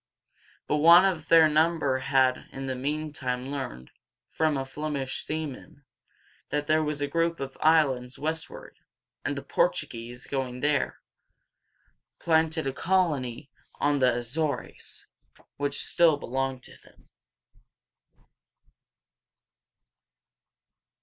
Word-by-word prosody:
But 150 - 0
one 170 +4 +8
of 175 -5 -1
their 165 -1 +7
number 155 -3 +2
had 130 -1 +1
in 135 0 -6
the 130 - -2
meantime 135 -2 -3
learned, 65 - -6 0.4
from 155 -2 +1
a 135 - -1
Flem´ish 140 -1 -4
seaman, 150 -1 -6 0.6
that 150 0 -1
there 155 +1 +3
was 150 -1 -3
a 145 - 0
group 165 +2 0
of 135 -1 -6
islands 135 -6 +2
westward, 160 - -5 0.4
and - - -2
the - - -5
Portuguese, 125 - -2
going 130 -2 -3
there, 145 -1 0 1.2
planted 160 -1 +1
a 135 - -1
colony 145 -9 0 0.2
on 145 0 +1
the 130 -1 +4
A 120 - -2
zores´, 140 +3 -4 0.5
which 145 0 -2
still 165 -4 +4
belong 135 -1 -3
to - - -13
them. - - -22
145 Hz, 110 wpm, -27 LUFS, 130-160 Hz, 1.2 s, one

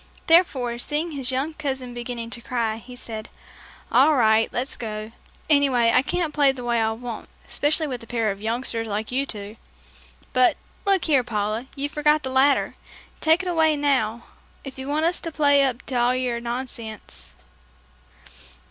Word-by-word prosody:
Therefore, 265 -9 +3
seeing 305 +6 -1
his 270 -4 -2
young 270 +5 -1
cousin 265 -5 -4
beginning 240 -1 -5
to 235 - -6
cry, 230 -3 -1
he 245 +2 -11
said, 220 -2 -7 0.6
"All 310 - +5
right, 220 -3 +4
let's 255 +3 -2
go. 215 -1 -5 0.4
Anyway, 270 -6 +4
I - - +6
can't 315 +2 -2
play 285 -2 +5
the 260 -2 -8
way 235 -1 +1
I 220 0 +1
want, 235 0 -7 0.2
especially 310 +2 +2
with 255 -5 -4
a 230 - -11
pair 225 -3 0
of 195 +1 -8
youngsters 225 0 -2
like 215 +2 -3
you 270 +2 0
two. 210 -1 -7 0.8
But, 255 -1 +4 0.3
look 390 -3 +3
here, 280 -5 +3
Paula, 215 +1 -2
you 280 +1 -1
forgot 300 +1 +2
the 260 - -3
ladder. 270 +2 +3 0.5
Take 320 +3 +3
it - - -5
away 320 -3 +3
now, 240 -6 +1 0.4
if 270 -1 -9
you 265 - -6
want 300 +3 +1
us 345 +2 +1
to 330 - -4
play 285 -2 +4
up 260 -2 0
to - - -7
all 245 +1 +3
your 250 -2 -1
nonsense." 235 - -6
255 Hz, 175 wpm, -24 LUFS, 230-290 Hz, 0.8 s, I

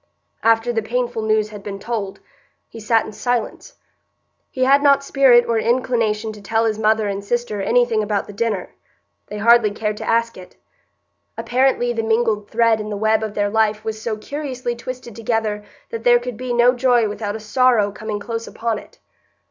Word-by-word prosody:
After 230 +1 +2
the 225 - 0
painful 240 +1 -2
news 215 -1 +1
had 210 -1 -9
been 200 0 -6
told, 200 -2 -5 0.5
he 225 - -11
sat 225 +1 +1
in - - -8
silence; 245 - -3 0.7
he 255 - -2
had 275 +2 +5
not 280 -1 +4
spirit 265 -4 +5
or 230 -1 0
inclination 225 -3 0
to 210 - -12
tell 225 +3 0
his 220 -1 -1
mother 215 0 +2
and 200 0 -3
sister 240 -1 -2
anything 240 0 +2
about 210 -1 -1
the 205 - -11
dinner; 205 -3 -2 0.5
they 210 - -7
hardly 230 +1 +5
cared 210 0 -3
to - - -5
ask 230 0 +1
it. 180 -1 -13 0.8
Apparently 250 -1 +1
the 225 - -1
mingled 220 -2 0
thread 230 -1 +2
in 215 - -6
the 205 - -4
web 220 +1 +2
of 215 -1 -5
their 205 -1 0
life 215 0 +1
was 220 -1 -4
so 220 -1 -3
curiously 255 0 -5
twisted 240 -1 -8
together 220 -2 -2 0.3
that 225 0 -5
there 240 0 +6
could 245 0 -5
be 255 +2 -5
no 240 +1 +4
joy 245 -2 +2
without 205 0 -4
a - - -5
sorrow 215 -1 +2
coming 210 0 -5
close 230 +2 -5
upon 230 -1 -3
it. - - -17
225 Hz, 190 wpm, -20 LUFS, 215-240 Hz, 0.8 s, there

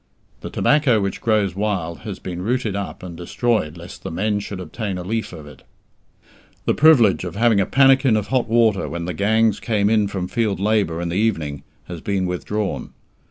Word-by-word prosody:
The - - -7
tobacco 145 -7 +3
which 100 -1 -3
grows 105 -5 +1
wild 95 -5 -2
has 100 -3 -7
been 90 -1 -6
rooted 115 0 -1
up 100 -2 -5
and 90 -2 -7
destroyed 90 -1 -1
lest 85 +2 -10
the - - -5
men 105 +5 -1
should 100 -1 -6
obtain 95 +3 -4
a 90 - -5
leaf 110 +4 -3
of 80 -4 -10
it. 75 -2 -14 1.0
The - - +2
privilege 130 - +5
of 90 0 -6
having 110 -2 +3
a 95 - -1
pannikin 135 -3 +4
of 105 - -3
hot 130 -3 +1
water 115 -3 +2
when 85 0 -4
the 90 - -3
gangs 110 +4 +2
came 105 -2 +1
in 105 -2 +3
from 95 -2 -4
field 105 0 -1
labour 100 -5 +1
in 85 - -3
the 85 - -2
evening 80 -10 -1 0.2
has 85 -2 -8
been 100 -2 -1
withdrawn. 95 +3 -3
100 Hz, 195 wpm, -21 LUFS, 90-110 Hz, 1.0 s, privilege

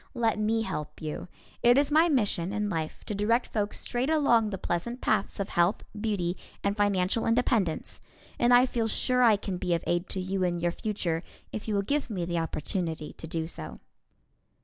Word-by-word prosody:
Let 230 -3 +1
me 225 +1 +1
help 150 -8 -5
you. 155 +2 -5 0.3
It 240 +2 +6
is 285 +1 +3
my 320 +3 +5
mission 205 - +1
in 210 0 -1
life 160 -3 -3
to - - -3
direct 225 +4 +1
folks 210 -2 -1
straight 250 +3 -1
along 240 -8 +4
the 195 - -3
pleasant 190 +9 -2
paths 210 -5 0
of 200 - -2
health, 175 +5 +2
beauty 205 -5 -1 0.3
and 200 0 +1
financial 205 +1 +1
independence, 230 -7 +1 0.4
and 240 0 +4
I 245 +1 +7
feel 235 -3 -1
sure 250 +3 +1
I 230 -3 +7
can 195 -2 -4
be 180 -2 +1
of 165 - -3
aid 175 +2 0
to 190 - -3
you 185 +1 -1
and 175 -1 0
your 175 0 +1
future 175 -5 -2 0.3
if 215 - -6
you 215 - 0
will 200 - +1
give 285 +5 -1
me 185 -6 -2
the 170 0 -1
opportunity 160 0 -3
to 160 - -9
do 160 0 -2
so. 80 - -8
205 Hz, 195 wpm, -28 LUFS, 175-230 Hz, 0.4 s, I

